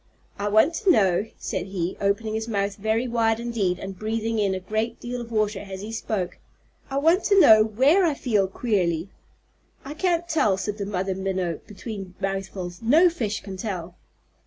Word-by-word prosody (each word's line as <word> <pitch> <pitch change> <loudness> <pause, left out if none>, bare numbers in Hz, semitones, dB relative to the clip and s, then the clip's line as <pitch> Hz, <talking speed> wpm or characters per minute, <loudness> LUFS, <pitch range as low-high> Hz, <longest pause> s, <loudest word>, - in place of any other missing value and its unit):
"I 205 - -1
want 220 +10 +4
to 420 -4 +1
know," 200 - +3
said 185 0 -4
he, 185 -2 -3
opening 205 +2 0
his 220 +1 -3
mouth 200 -2 -1
very 220 +4 0
wide 225 -1 +1
indeed 225 -7 -1
and 190 0 -8
breathing 225 +1 -1
in 195 -2 +1
a - - -3
great 220 +5 -2
deal 245 0 -5
of 235 0 -9
water 215 -2 0
as 195 -1 -7
he 215 +2 -6
spoke, 210 -5 -3 0.5
"I 270 - -2
want 330 +7 +3
to 400 -2 +5
know 220 -10 +8
where 265 - +3
I 320 -5 +2
feel 210 -8 +1
queerly." 190 -5 -1 0.7
"I 280 - -6
can't 345 +1 0
tell," 215 - +2
said 205 +2 -4
the 200 - -3
Mother 190 -1 -1
Minnow, 190 -3 -2
between 200 -3 -8
mouthfuls. 190 -2 -4
"No 315 +10 +5
fish 215 -10 -3
can 195 -2 -8
tell." 185 -4 -5
215 Hz, 185 wpm, -24 LUFS, 190-235 Hz, 0.7 s, know